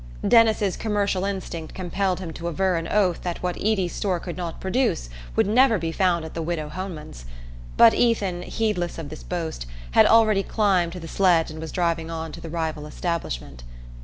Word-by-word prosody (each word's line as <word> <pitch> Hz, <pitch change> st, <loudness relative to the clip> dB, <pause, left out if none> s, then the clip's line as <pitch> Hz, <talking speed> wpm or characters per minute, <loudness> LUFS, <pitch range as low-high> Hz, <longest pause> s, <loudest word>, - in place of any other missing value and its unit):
Denis's 220 Hz, -4 st, +4 dB
commercial 200 Hz, -3 st, 0 dB
instinct 185 Hz, -5 st, -5 dB
compelled 185 Hz, 0 st, -1 dB
him 170 Hz, -4 st, -6 dB
to 170 Hz, +1 st, -5 dB
aver 185 Hz, +2 st, +1 dB
on 165 Hz, 0 st, -2 dB
oath 190 Hz, -5 st, +1 dB
that 175 Hz, 0 st, -4 dB
what 180 Hz, -1 st, -1 dB
Eady's 195 Hz, -5 st, 0 dB
store 185 Hz, -4 st, -1 dB
could 175 Hz, 0 st, -6 dB
not 175 Hz, -2 st, -5 dB
produce 190 Hz, -, 0 dB, 0.2 s
would -, -, +3 dB
never 230 Hz, +2 st, +4 dB
be 165 Hz, -2 st, -3 dB
found 170 Hz, -2 st, +1 dB
at 160 Hz, -, -8 dB
the 165 Hz, -, -3 dB
widow 160 Hz, -2 st, -3 dB
Homan's; 155 Hz, -, -7 dB, 0.5 s
but 230 Hz, -1 st, +8 dB
Ethan, 200 Hz, -7 st, +1 dB
heedless 180 Hz, -4 st, -2 dB
of 160 Hz, -3 st, -6 dB
this 155 Hz, -, -9 dB
boast, 160 Hz, -, -4 dB, 0.2 s
had -, -, +6 dB
already 215 Hz, -3 st, +5 dB
climbed 190 Hz, -5 st, +1 dB
to 180 Hz, -, -6 dB
the 165 Hz, -, -8 dB
sledge 170 Hz, -3 st, +3 dB
and 155 Hz, 0 st, -8 dB
was 160 Hz, -, -6 dB
driving 170 Hz, -2 st, -1 dB
on 160 Hz, -1 st, -5 dB
to -, -, -9 dB
the 165 Hz, -, -7 dB
rival 160 Hz, -2 st, -3 dB
establishment. 150 Hz, -, -4 dB
175 Hz, 190 wpm, -24 LUFS, 165-195 Hz, 0.5 s, but